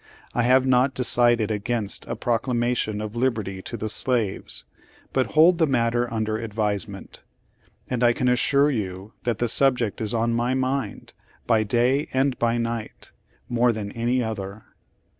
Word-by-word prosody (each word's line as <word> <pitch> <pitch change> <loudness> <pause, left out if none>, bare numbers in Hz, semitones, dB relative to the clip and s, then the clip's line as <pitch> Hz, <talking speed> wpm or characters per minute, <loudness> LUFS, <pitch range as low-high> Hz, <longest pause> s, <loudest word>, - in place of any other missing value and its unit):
I 120 - +1
have 130 +2 +4
not 130 0 +3
decided 120 -3 +3
against 105 0 -1
a - - -3
proclamation 120 -2 -1
of 110 +1 -6
lib 125 0 +1
erty 95 -3 -6
to 115 - -5
the 110 - -3
slaves, 110 -2 -1 0.5
but 130 -1 0
hold 170 +2 +6
the 160 - +4
matter 120 -2 +1
under 110 -1 -1
advisement. 105 -3 -4 0.7
And 125 -1 -1
I 120 - +6
can 125 +1 -1
assure 140 +4 +3
you 100 -3 -4
that 120 -3 0
the 120 - 0
subject 125 -3 +2
is 110 +1 -1
on 115 +1 +1
my 120 +2 0
mind, 130 +1 -3 0.3
by 115 -2 +3
day 125 +7 +1
and 130 0 +1
by 120 0 +1
night, 115 -1 -4 0.4
more 120 0 +2
than 105 -3 -5
any 120 +2 0
other. 100 -2 -5
120 Hz, 160 wpm, -24 LUFS, 110-125 Hz, 0.7 s, hold